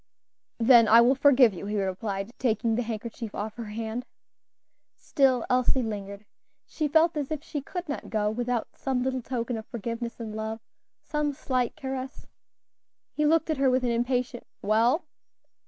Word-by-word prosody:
"Then 230 -1 +6
I 225 +2 +8
will 240 +3 +6
forgive 265 -5 +5
you," 190 +2 -7
he 210 0 -1
replied, 195 +2 -3
taking 225 -2 +1
the 235 - +1
handkerchief 225 -1 -5
off 210 +1 -4
her 235 - -5
hand. 225 +3 -5 0.9
Still 260 -4 +2
Elsie 255 +1 +2
lingered. 200 -2 -6 0.4
She 310 - -2
felt 320 +3 +3
as 290 -3 -2
if 310 -2 -4
she 295 -3 -4
could 355 +5 -6
not 290 - -5
go 210 -1 0
without 240 0 -2
some 260 -2 -1
little 260 0 -1
token 240 -1 -3
of 220 - -11
forgiveness 235 +1 -5
and 220 -2 -6
love, 220 +1 -4 0.4
some 300 -1 -1
slight 255 -3 -1
caress. 265 -3 -6 0.9
He 300 0 +1
looked 320 +1 +2
at 310 - -1
her 270 -1 +3
with 255 0 +2
an 245 - +1
impatient 245 +1 -1 0.2
"Well?" 230 - +2
240 Hz, 165 wpm, -27 LUFS, 220-265 Hz, 0.9 s, I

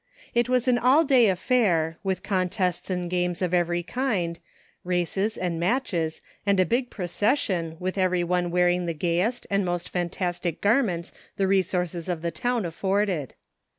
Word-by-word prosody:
It 240 0 +2
wasi 250 0 +1
an 245 - +4
all 265 +7 +5
day 260 -6 +5
affair, 175 -5 +1
with 190 -2 -2
contests 185 -2 -1
and 180 -1 -2
games 175 0 -1
of 180 -1 -1
every 175 0 +1
kind, 185 -8 -1 0.4
races 180 +4 -1
and 175 -2 -2
matches 175 -6 -1 0.2
and 200 -1 +2
a 185 - +5
big 245 +6 0
procession 180 - -1
with 185 +2 -2
everyone 180 -1 +1
wearing 180 0 +2
the 165 - -2
gayest 180 +9 0
and 200 0 +2
most 175 -1 -2
fantastic 175 -1 -2
garments 205 -6 +1 0.3
the 195 - +2
resources 180 -2 0
of 170 -2 -3
the 170 - -1
town 245 -2 -1
afforded. 190 -3 -1
180 Hz, 150 wpm, -25 LUFS, 175-210 Hz, 0.4 s, all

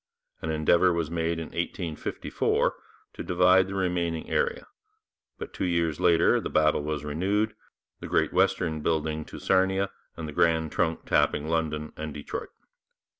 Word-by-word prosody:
An 80 - -3
endeavour 80 +3 +3
was 85 -2 -2
made 85 0 -1
in 80 -1 -5
1854 85 -1 -1 0.4
to - - -6
divide 90 +1 +4
the 100 - -5
remaining 90 -3 -1
area, 485 0 0 0.7
but - - -8
two 95 - -2
years 85 -3 0
later 85 -1 +4
the - - -4
battle 75 -1 +3
was 75 -1 -3
renewed, 100 +8 0 0.5
the - - -7
Great - - +1
Western 80 -1 +1
building 80 0 -1
to - - -10
Sarnia 95 +1 +1 0.3
and 80 -1 -5
the 75 - -7
Grand 80 -1 +2
Trunk 80 -2 -1
tapping 75 +1 +1
London 80 -2 -2
and 75 -1 -6
Detroit. 75 - -6
80 Hz, 150 wpm, -27 LUFS, 80-90 Hz, 0.7 s, divide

